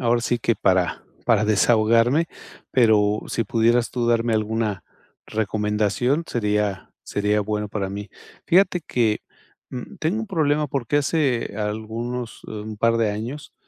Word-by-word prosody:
ahora 120 -1 +2
sí 120 0 0
que 115 0 +1
para 95 -3 +1 0.2
para 110 -2 +4
desahogarme, 115 +7 +3 0.5
pero 105 -4 +4
si 115 - -1
pudieras 115 +2 +2
tú 120 -2 0
darme 115 0 +2
alguna 110 -2 -1 0.4
recomendación, 110 - 0
sería 105 -3 -1
sería 105 +1 0
bueno 105 0 -2
para 100 -2 -3
mí. 100 +1 -6 0.4
Fíjate 180 0 +4
que, 115 -8 0 0.5
mm, 125 -2 -7
tengo 175 +8 0
un 225 - -4
problema 150 -5 +1
porque 135 0 -1
hace 140 -6 0
algunos, 110 +3 -4
eh, - - -8
un 105 0 -6
par 115 +1 +3
de 115 -2 +2
años, 120 +8 -6
115 Hz, 140 wpm, -23 LUFS, 105-125 Hz, 0.5 s, para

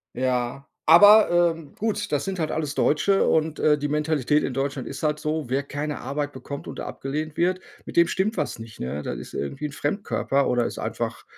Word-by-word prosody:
Ja, 125 +1 -1 0.2
aber, 205 +7 +8 0.2
ähm, 160 -4 -13
gut. 210 -1 -2
Das 145 - +1
sind 195 -1 -4
halt 155 -2 -1
alles 150 -3 -2
Deutsche 195 +6 +2
und, 160 -1 +1
äh, 150 -1 +4
die 145 0 -2
Mentalität 150 -1 +1
in 125 - -2
Deutschland 135 -1 -2
ist - - -7
halt 150 -1 +1
so: 155 0 -2
Wer 135 +2 0
keine 145 +1 -4
Arbeit 145 +1 -3
bekommt 140 +2 -8
und - - -6
abgelehnt 150 +3 -4
wird, 185 +2 +1 0.2
mit - - -9
dem 170 0 +5
stimmt 205 +3 0
was 150 -5 -2
nicht, 115 -1 -11
ne? 70 +4 -3
Das - - -4
ist 60 - -10
irgendwie 135 - -3
ein 145 - -7
Fremdkörper 145 -3 0
oder 125 -1 +2
ist - - -6
einfach, - - -4
150 Hz, 205 wpm, -24 LUFS, 135-160 Hz, 0.2 s, aber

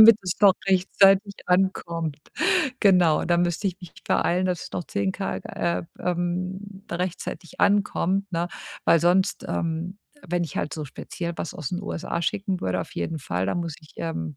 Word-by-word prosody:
damit 220 0 +10
es 180 -2 -1
noch 200 -2 +7
rechtzeitig 195 +1 +4
ankommt. 170 -4 0 0.6
Genau, 180 -6 +5
da 175 - +3
müsste 175 +3 +1
ich 185 - -6
mich 180 -3 -11 0.2
beeilen, 180 +2 +2
dass 180 -2 -1
es - - -10
noch 175 - -3
10 200 -2 -1
k 195 0 -3
äh, 170 0 -2 0.2
ähm, 185 +3 -3
rechtzeitig 175 0 -4
ankommt, 200 -1 +2
ne? 170 +1 0 0.4
Weil 165 - +5
sonst, 180 +3 +2
ähm, 170 +4 -2 0.3
wenn 175 +1 0
ich 165 - -8
halt - - -2
so 155 -2 -4
speziell 170 +5 -5
was - - -4
aus 150 -3 -4
den 180 - -2
USA 170 -3 -3
schicken 195 +1 -1
würde, 90 -1 0
auf 90 - -7
jeden 155 - -2
Fall, 90 -4 -2
dann 100 - 0
muss 165 -3 -4
ich, 155 - -18
ähm, 80 -2 -4
175 Hz, 175 wpm, -25 LUFS, 165-190 Hz, 0.6 s, damit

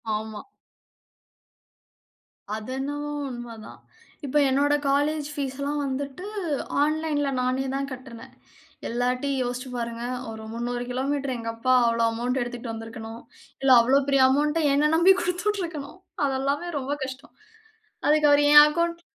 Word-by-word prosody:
ஆமா. 215 0 -5 2.1
அது 220 +2 -7
என்னவோ 290 +2 -3 0.2
உண்மதான். 240 -3 -9 0.4
இப்ப 280 +2 0
என்னோட 285 +2 +2 0.2
காலேஜ் 290 +1 +1
பீஸ்செல்லாம் 280 +1 -3
வந்துட்டு, 275 +6 -4 0.6
ஆன்லைன்ல 300 -2 0
நானே 255 +2 0
தான் 275 0 -2
கட்டனேன். 250 -3 -10 0.6
எல்லார்ட்டயும் 250 +3 -1
யோசிச்சு 245 +2 -4
பாருங்க. 235 0 -4 0.3
ஒரு 220 0 -8
300 240 +1 -3
கிலோமீட்டர் 270 0 -1
எங்க 230 0 -5
அப்பா 255 +3 +1
அவ்ளோ 230 0 +1
அமவுண்டு 245 +3 -1
எடுத்துகிட்டு 240 -1 -6
வந்திருக்கணும். 225 0 -8 0.4
இல்ல, 270 -1 +3
அவ்வளவு 270 +3 +2
பெரிய 275 -1 +4
அமவுண்ட்ட 300 +4 +1
என்னை 295 +2 +3
நம்பி 365 +4 +6
குடுத்து 360 +2 -2
விட்டுருக்கணும். 340 -5 -4 0.3
அதெல்லாமே 275 +5 -1
ரொம்ப 270 +2 -4
கஷ்டம். 265 +3 -8 0.7
அதுக்கு 300 0 +4
அவர் 290 0 +5
என் 295 0 +11
அக்கவுண்ட் 335 +2 -1
270 Hz, 125 wpm, -25 LUFS, 245-295 Hz, 2.1 s, என்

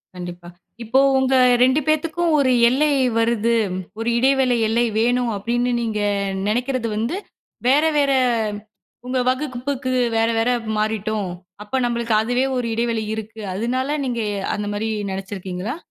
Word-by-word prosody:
கண்டிப்பா. 175 -1 -8 0.3
இப்போ 235 +4 +2 0.2
உங்க 265 0 +2 0.3
2 260 +3 +4
பேத்துக்கும் 325 +2 +1
ஒரு 265 -2 +3 0.2
எல்லை 295 +4 +2 0.3
வருது, 230 0 +2 0.4
ஒரு 230 +1 -1
இடைவேளை 265 -1 +3
எல்லை 235 +2 +2
வேணும் 245 0 +1
அப்டீன்னு 240 +4 -1
நீங்க 220 -2 -2 0.5
நெனைக்கிறது 245 +2 -1
வந்து 230 - -1 0.5
வேற, 280 +4 +4
வேற 280 -1 +3 1.0
உங்க 255 0 0
வகுப்புக்கு 260 0 -2 0.3
வேற, 225 0 +3
வேற 230 +2 +1 0.3
மாறிட்டோம். 215 -2 -1 0.3
அப்போ 210 +5 -5
நம்பளுக்கு 235 -1 -1
அதுவே 245 +3 0
ஒரு 245 -2 -1
இடைவெளி 230 -1 -1
இருக்கு. 220 0 -7
அதனால 255 +7 -1
நீங்க 240 -3 -2 0.2
எ - - -3 0.2
அந்த 210 0 -4
மாரி 215 +2 -2 0.2
நெனைச்சிருக்கீங்களா? 190 - -5
235 Hz, 130 wpm, -21 LUFS, 220-260 Hz, 1.0 s, 2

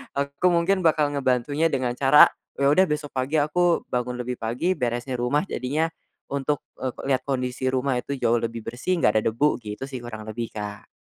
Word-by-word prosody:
aku 140 +4 0
mungkin 175 +3 +2
bakal 150 -2 +3
ngebantunya 140 +3 +1
dengan 130 -2 0
cara, 140 +2 +8 0.3
eee, - - -1
ya - - +6
udah 190 +5 +5
besok 150 -1 -2
pagi 130 +4 -1
aku 175 +3 +2
bangun 125 0 -1
lebih 125 0 -4
pagi 120 +11 -1
beresin 120 +1 -2
rumah 140 +7 +1
jadinya, 150 +6 -1 0.4
untuk, 140 +1 -1 0.2
eee, 130 -2 -2 0.2
liat 130 - +1
kondisi 130 -1 -2
rumah 130 0 +1
itu 140 +3 -4
jauh 115 -1 +2
lebih 115 0 -4
bersih 125 +11 -1
gak 105 +1 +4
ada 110 - +1
debu, 145 +4 +1
gitu 105 +4 -6
sih 130 -2 -5
kurang 110 -2 -7
lebih 115 +1 -4
Kak. 105 -1 -6
130 Hz, 190 wpm, -24 LUFS, 120-145 Hz, 0.4 s, cara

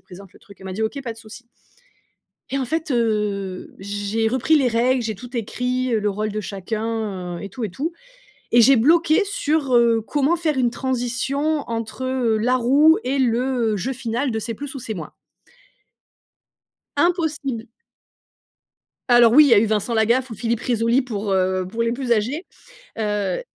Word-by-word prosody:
présente 190 +1 -14
le - - -18
truc». 200 - -17
Elle 190 - -10
m'a 190 - -5
dit: 215 +4 -3
«OK, 250 +6 -2
pas 235 -3 -4
de 225 - -16
souci». 225 +2 -12 1.1
Et 275 - -1
en 265 - -1
fait, 320 +3 -2
heu, 210 -5 -1
j'ai 205 +3 -2
repris 260 +7 +2
les 275 -4 +3
règles. 245 +2 +2
J'ai 220 -1 -3
tout 245 +5 -10
écrit, 250 +2 -2
heu, 220 - +2
le 210 - 0
rôle 210 +1 -2
de 215 - -3
chacun 205 -2 -4
et 200 - -7
tout 240 +5 -7
et 215 - -2
tout 300 - -4 0.6
et 240 - +6
j'ai 270 +3 +6
bloqué 315 - +4
sur, 300 -8 0
heu, 235 -1 +4
comment 290 +8 +1
faire 315 -4 -1
une 245 -2 +2
transition 265 +4 -2
entre, 230 +2 -4
heu, 255 -4 +1
la 250 +4 +2
Roue 280 +6 +5
et 265 +2 -1
le 240 -3 +1
jeu 255 +8 -3
final 245 +1 -2
de 220 - -2
C’est 230 +1 -5
plus 285 +4 -7
ou 275 - -6
c’est 225 -3 -5
moins. 160 -4 -8 1.8
Impossible. 310 - 0 1.5
Alors 240 -1 +6
oui, 300 +3 +8
il - - +3
y - - +7
a 205 - +7
eu 225 - +2
Vincent 215 +2 -1
Lagaffe 235 +4 +2
ou 225 - -7
Philippe 230 +1 -2
Rizzoli 235 +2 +1
pour, 210 -5 -4
heu 185 -1 0
pour 230 +3 -2
les 230 - 0
plus 245 0 -3
âgés. 245 - -2 0.5
Heu 210 -4 -1
235 Hz, 185 wpm, -21 LUFS, 215-265 Hz, 1.8 s, oui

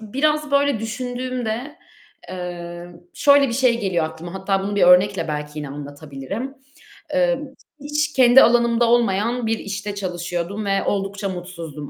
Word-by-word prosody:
biraz 300 +7 0
böyle 280 -4 +2
düşündüğümde, 245 +3 -4 0.5
eee, 175 -1 -6 0.3
şöyle 280 -1 +5
bir - - -3
şey 240 -2 +2
geliyor 185 -6 0
aklıma; 160 +3 -7
hatta 195 0 -1
bunu 205 +1 -3
bir - - +2
örnekle 180 +1 +5
belki 150 0 -4
yine 150 -2 -5
anlatabilirim. 145 - -7 0.6
Eee, 265 -1 +2 0.4
hiç 295 +1 -2
kendi 255 0 +7
alanımda 235 0 +3
olmayan 235 +1 +1
bir 225 0 0
işte 205 0 -5
çalışıyordum 180 +1 -4
ve 195 0 +1
oldukça 195 0 -2
mutsuzdum 170 -5 -7
205 Hz, 135 wpm, -21 LUFS, 175-245 Hz, 0.6 s, kendi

